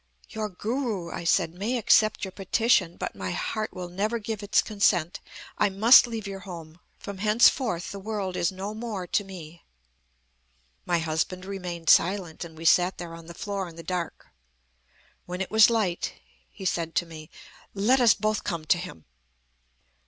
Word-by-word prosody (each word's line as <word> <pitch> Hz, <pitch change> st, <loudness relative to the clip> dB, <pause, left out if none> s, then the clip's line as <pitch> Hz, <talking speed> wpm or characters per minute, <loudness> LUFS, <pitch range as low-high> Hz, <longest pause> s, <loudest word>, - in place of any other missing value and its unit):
"'Your 215 Hz, -1 st, -4 dB
Guru,' 210 Hz, -3 st, -3 dB
I -, -, -5 dB
said, 170 Hz, -1 st, +2 dB
'may 210 Hz, +8 st, -2 dB
accept 215 Hz, -2 st, +3 dB
your 190 Hz, -, -7 dB
petition; 195 Hz, -2 st, +1 dB
but -, -, -4 dB
my 95 Hz, -1 st, -4 dB
heart 215 Hz, -1 st, -3 dB
will 180 Hz, -2 st, -6 dB
never 205 Hz, +6 st, -1 dB
give 220 Hz, -1 st, -5 dB
its 205 Hz, 0 st, +2 dB
consent. 190 Hz, -5 st, +1 dB, 0.4 s
I 210 Hz, -, +4 dB
must 220 Hz, +6 st, +7 dB
leave 225 Hz, -3 st, -5 dB
your 195 Hz, -1 st, -6 dB
home. 170 Hz, -3 st, -10 dB, 0.2 s
From 200 Hz, -2 st, -8 dB
henceforth, 215 Hz, -, +3 dB
the 200 Hz, -, -7 dB
world 195 Hz, -2 st, -4 dB
is 170 Hz, -, +1 dB
no 195 Hz, +2 st, -5 dB
more 215 Hz, -4 st, -5 dB
to 205 Hz, -, 0 dB
me.' 170 Hz, -4 st, -11 dB, 1.2 s
"My 175 Hz, -, +2 dB
husband 165 Hz, +3 st, -2 dB
remained 180 Hz, -4 st, -6 dB
silent, 180 Hz, -3 st, +2 dB
and 160 Hz, -2 st, -11 dB
we 165 Hz, -, -8 dB
sat 180 Hz, +3 st, +4 dB
there 170 Hz, -1 st, -7 dB
on 165 Hz, -1 st, -11 dB
the 170 Hz, -, -10 dB
floor 200 Hz, -2 st, -4 dB
in 165 Hz, -, -12 dB
the 165 Hz, -, -9 dB
dark. 180 Hz, -2 st, -4 dB, 1.0 s
When 180 Hz, +1 st, -5 dB
it 190 Hz, -, -3 dB
was 220 Hz, +1 st, +7 dB
light, 210 Hz, -7 st, -1 dB, 0.3 s
he 190 Hz, -, -10 dB
said 165 Hz, -2 st, -1 dB
to 175 Hz, -, +1 dB
me: 155 Hz, -2 st, -11 dB, 0.5 s
'Let 240 Hz, +7 st, +3 dB
us 235 Hz, -2 st, +6 dB
both 215 Hz, 0 st, -1 dB
come 165 Hz, -2 st, -3 dB
to 175 Hz, +1 st, +3 dB
him.' 125 Hz, -, -9 dB
190 Hz, 175 wpm, -26 LUFS, 170-215 Hz, 1.2 s, must